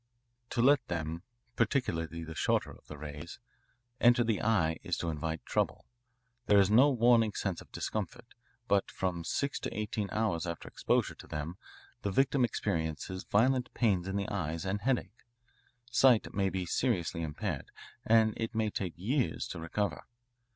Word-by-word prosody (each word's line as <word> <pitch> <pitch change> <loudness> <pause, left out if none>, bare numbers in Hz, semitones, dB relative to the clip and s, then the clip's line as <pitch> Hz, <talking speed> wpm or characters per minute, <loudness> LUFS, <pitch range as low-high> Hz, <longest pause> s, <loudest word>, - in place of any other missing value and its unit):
To 120 - +1
let 140 -1 +5
them 85 -1 -3 0.3
=20 - - -42
particularly 85 - 0
the 80 0 -7
shorter 80 - +1
of - - -16
the 75 - -8
rays 75 +2 -8 0.6
enter 120 0 +5
the 115 -3 0
eye 85 -8 +2
is - - -2
to 85 - -2
invite 80 +1 -4
trouble. - - -1 0.6
There 105 - +6
is 100 0 +5
no 130 +7 +7
warning 120 -4 +4
sense 95 -4 -2
of - - -16
discomfort, 110 +3 -4 0.4
but 100 -1 +2
from 90 -3 -2
six 140 +10 -1
to 130 - -5
eighteen 105 -1 -2
hours 95 -6 0
after 85 -1 -5
exposure - - 0
to - - -13
them 75 +5 -5 0.4
the 100 - -1
victim 135 +5 +2
experiences 95 -5 -2
violent 125 +4 +2
pains 95 -7 +2
in 95 - -3
the 100 -1 -1
eyes 80 +4 -3
and 100 +2 -1
headache. 125 -1 -1 0.7
Sight 125 -3 +4
may 95 -1 +1
be 95 -1 -2
seriously 85 - 0
impaired, 80 0 -3 0.3
and 110 -1 +4
it 115 0 -3
may 110 -1 +1
take 90 -5 -4
years 115 - 0
to - - -5
recover. 100 +5 -2
100 Hz, 165 wpm, -31 LUFS, 85-115 Hz, 0.7 s, no